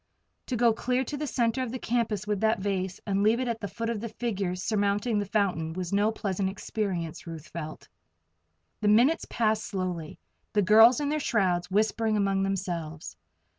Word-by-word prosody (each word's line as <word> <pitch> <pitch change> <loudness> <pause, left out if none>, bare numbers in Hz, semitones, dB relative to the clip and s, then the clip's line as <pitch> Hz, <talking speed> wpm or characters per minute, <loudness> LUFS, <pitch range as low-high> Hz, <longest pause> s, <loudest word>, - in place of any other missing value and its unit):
To 255 - -1
go 235 -1 +4
clear 250 +3 0
to 290 - -5
the 295 +1 -3
center 235 -1 0
of 255 -3 -3
the 255 - -3
campus 230 -4 -1
with 210 -2 -1
that 220 +1 +2
vase, 190 -1 -2
and 200 -1 0
leave 220 +3 +3
it 255 - -1
at 230 -1 -2
the 205 - -3
foot 230 +3 -4
of 215 -3 -3
the 230 - -4
figure 205 -5 -2
surmounting 205 +3 0
the 205 - -2
fountain, 180 -6 0
was 180 +1 -4
no 205 +2 +3
pleasant 195 -3 -2
experience, 190 -5 -4
Ruth 165 -2 -7
felt. 155 -2 -7 0.9
The 210 - +1
minutes 245 +10 +4
passed 220 -2 +1
slowly, 180 -5 -4 0.4
the 205 -1 +3
girls 225 +6 +7
in 285 - 0
their 305 +1 0
shrouds 185 -9 +1
whispering 215 +2 +1
among 195 -1 +1
themselves. 170 - -3
205 Hz, 185 wpm, -28 LUFS, 185-230 Hz, 0.9 s, girls